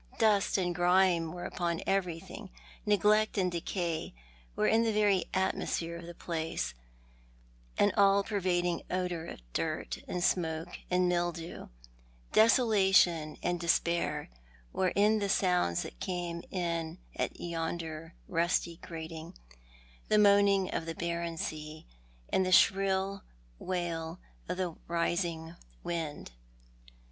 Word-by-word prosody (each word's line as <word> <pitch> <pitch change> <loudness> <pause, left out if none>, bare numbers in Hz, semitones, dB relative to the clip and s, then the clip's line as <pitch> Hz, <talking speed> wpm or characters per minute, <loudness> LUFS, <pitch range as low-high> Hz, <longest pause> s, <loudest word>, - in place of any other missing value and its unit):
Dust 210 -3 +3
and 180 -2 0
grime 175 -1 +3
were 175 +1 -6
upon 170 -2 -2
everything, 180 -4 -2 0.4
neglect 210 +1 +3
and 185 -2 +2
decay 170 - -3 0.4
were - - +1
in 225 - +4
the 230 -1 +2
very 205 -3 +3
atmosphere 170 -3 -1
of 170 0 -8
the 175 - -9
place, 165 - -3 1.0
an 205 - +4
all 200 0 +5
pervading 180 -4 0
odour 180 -3 -2
of - - -9
dirt - - -2
and 180 -1 -2
smoke 165 -1 -1
and 180 0 +3
mildew. 175 -1 -2 0.7
Desolation 195 -9 +4
and 175 0 0
despair 170 -3 0 0.4
were 185 -1 +2
in 210 +2 +4
the 200 -1 -1
sounds 180 - +2
that - - -10
came 175 -2 -3
in 170 -2 -2 0.2
at - - -3
yonder 165 -1 -4
rusty 170 0 0
grating, 160 -1 -8 0.7
the 215 - +3
moaning 200 -2 +5
of 165 - -2
the 165 - -4
barren 170 -1 -3
sea, 155 0 -5 0.4
and 190 - +2
the 185 - -1
shrill 195 +1 +3 0.4
wail 170 -2 -3 0.3
of 180 - -2
the 185 -2 -1 0.2
rising 170 -1 -1 0.3
wind. 165 -4 -4
175 Hz, 120 wpm, -31 LUFS, 165-190 Hz, 1.0 s, all